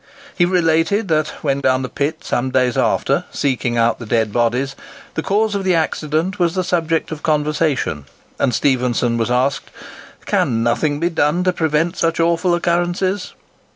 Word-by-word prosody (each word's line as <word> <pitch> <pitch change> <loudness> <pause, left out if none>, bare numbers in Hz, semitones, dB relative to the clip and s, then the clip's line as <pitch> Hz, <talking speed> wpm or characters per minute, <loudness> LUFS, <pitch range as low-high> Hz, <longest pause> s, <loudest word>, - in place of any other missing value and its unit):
He 175 - +3
related 175 +3 +1
that, 155 -1 +2 0.2
when 140 -2 0
down 130 -1 +1
the - - -2
pit 145 +5 -3
some 125 +2 -1
days 125 -1 +1
after, - - +1
seeking 125 -3 -1
out 115 0 +2
the 115 - -8
dead 110 -2 0
bodies, 125 +4 0 0.4
the - - -2
cause 210 +4 +1
of 200 -1 -2
the 185 -2 +2
accident 160 +4 -1
was 175 -1 +1
the 185 - 0
subject 165 -3 -1
of 155 -1 -6
conversation, 150 - 0 0.3
and 130 - +2
Stephenson 125 -2 +1
was 115 - 0
asked, 130 +3 0 0.6
"Can 115 0 +1
nothing 145 +5 0
be 170 +2 0
done 160 +2 +1
to 185 0 +2
prevent 160 0 0
such 165 0 0
awful 170 +1 +2
occurrences?" 175 +3 -1
155 Hz, 165 wpm, -19 LUFS, 130-175 Hz, 0.6 s, He